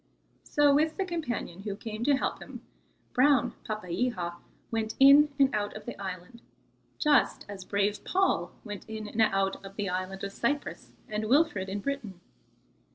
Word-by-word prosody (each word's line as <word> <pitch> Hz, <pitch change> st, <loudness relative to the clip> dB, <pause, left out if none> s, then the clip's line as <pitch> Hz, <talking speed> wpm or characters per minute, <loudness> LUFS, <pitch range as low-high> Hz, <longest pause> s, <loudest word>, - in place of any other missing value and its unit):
So 290 Hz, -1 st, +3 dB
with 310 Hz, +2 st, +2 dB
the 385 Hz, -, 0 dB
companion 295 Hz, -, -4 dB
who 200 Hz, -1 st, -4 dB
came 220 Hz, +1 st, -6 dB
to 285 Hz, 0 st, +5 dB
help -, -, -2 dB
him, -, -, -10 dB, 0.5 s
brown 270 Hz, 0 st, +4 dB
Papeiha 205 Hz, -2 st, -2 dB, 0.4 s
went 225 Hz, -1 st, -2 dB
in 280 Hz, +2 st, +8 dB
and 275 Hz, -2 st, +4 dB
out 205 Hz, -1 st, -1 dB
of 215 Hz, -, -8 dB
the -, -, -5 dB
island 190 Hz, +5 st, -7 dB, 0.6 s
just 295 Hz, -3 st, +3 dB
as 200 Hz, -2 st, -8 dB
brave 200 Hz, +2 st, 0 dB
Paul 380 Hz, +1 st, +1 dB
went 205 Hz, -1 st, -8 dB
in 220 Hz, -1 st, -5 dB
and 220 Hz, +2 st, -1 dB
out 195 Hz, -3 st, +1 dB
in 195 Hz, -, -8 dB
the 200 Hz, -2 st, -2 dB
island 185 Hz, +2 st, -4 dB
of 200 Hz, -, -3 dB
Cyprus 280 Hz, +8 st, -3 dB
and 215 Hz, 0 st, -3 dB
Wilfrid 255 Hz, -, +3 dB
in 200 Hz, +1 st, -3 dB
Britain. 230 Hz, -8 st, -4 dB
215 Hz, 160 wpm, -29 LUFS, 195-280 Hz, 0.6 s, in